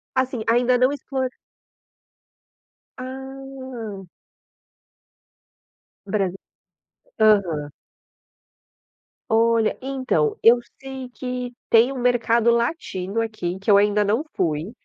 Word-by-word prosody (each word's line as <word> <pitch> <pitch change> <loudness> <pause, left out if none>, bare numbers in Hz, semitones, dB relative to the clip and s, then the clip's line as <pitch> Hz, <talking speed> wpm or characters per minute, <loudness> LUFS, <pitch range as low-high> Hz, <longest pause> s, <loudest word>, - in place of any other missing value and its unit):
Assim, 260 -3 0
ainda 245 +2 +3
não 255 +2 +3
explo 280 -1 -5 1.8
Ah! 260 -5 -7 2.0
Brasi 195 -2 -1 0.8
aham. 180 -9 +3 1.6
Olha, 225 0 +3
então, 275 - 0
eu 235 +1 +7 0.2
sei 265 -1 -7
que 250 0 -5 0.2
tem 235 +3 +5
um 270 - -5
mercado 235 -1 +3
latino 230 - -1
aqui, 205 -5 -3
que 200 +2 +1
eu 200 - +7
ainda 210 +1 +3
não 220 +8 +1
fui, 165 +1 -1
235 Hz, 90 wpm, -23 LUFS, 205-260 Hz, 2.0 s, eu